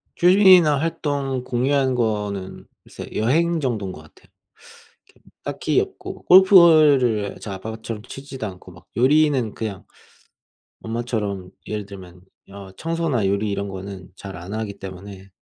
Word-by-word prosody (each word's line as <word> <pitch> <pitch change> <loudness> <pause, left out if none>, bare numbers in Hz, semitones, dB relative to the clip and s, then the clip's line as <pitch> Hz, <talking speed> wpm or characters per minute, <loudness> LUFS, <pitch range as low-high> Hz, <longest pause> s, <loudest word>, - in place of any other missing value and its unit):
취미나 180 -4 +6
활동 140 -4 -2
공유하는 130 +1 0
거는 105 -5 -3 0.2
글쎄 - - -10
여행 165 +9 +1
정도인 110 -9 -2
것 80 - -11
같아요. 75 - -21 0.8
이렇게 - - -27 0.2
딱히 - - 0
없고 - - -8
골프를 155 - +6
저희 100 -3 -6
아빠처럼 110 +2 -7
치지도 135 -1 -8
않고 90 -1 -11
막 85 - -17
요리는 135 -3 +3
그냥 105 -4 -6 1.0
엄마처럼 110 -5 -4 0.2
예를 105 -2 -4
들면 90 -3 -12 0.3
어 100 -1 -10
청소나 160 - -1
요리 100 +2 0
이런 100 0 -3
거는 95 -1 -8
잘 95 -2 -9
안 90 +4 -8
하기 110 -2 -5
때문에 95 +1 -10
110 Hz, 285 characters per minute, -22 LUFS, 100-140 Hz, 1.0 s, 취미나